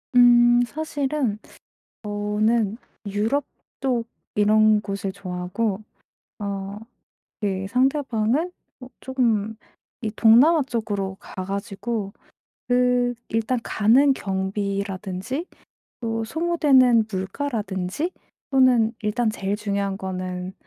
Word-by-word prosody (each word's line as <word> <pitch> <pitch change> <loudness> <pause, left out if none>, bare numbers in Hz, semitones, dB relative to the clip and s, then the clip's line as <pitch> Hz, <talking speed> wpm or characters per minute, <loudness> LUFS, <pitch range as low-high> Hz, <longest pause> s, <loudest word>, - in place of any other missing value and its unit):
음 240 0 +7
사실은 285 -5 -2 0.7
저는 210 +1 0 0.3
유럽 220 +8 0 0.3
쪽 245 -4 0 0.3
이런 215 0 +4
곳을 195 -1 -4
좋아하고 190 +3 -3 0.6
어 200 0 -4 0.6
예 195 -1 -1
상대방은 265 - +1 0.3
어 250 - -9
쪼금 225 -5 0 0.4
이 220 -2 -2
동남아 275 +8 +6
쪽으로 205 -6 -3
가 185 - -7
가지고 200 +2 -4 0.5
그 245 0 +2 0.2
일단 225 +2 0
가는 250 +7 +4
경비라든지 195 - -3 0.5
또 225 -1 -2
소모되는 265 -6 +3
물가라든지 200 - -3 0.4
또는 250 -4 +4
일단 220 +2 0
제일 200 -1 -2
중요한 200 -2 -2
거는 185 -1 -5
220 Hz, 195 characters per minute, -23 LUFS, 200-250 Hz, 0.7 s, 음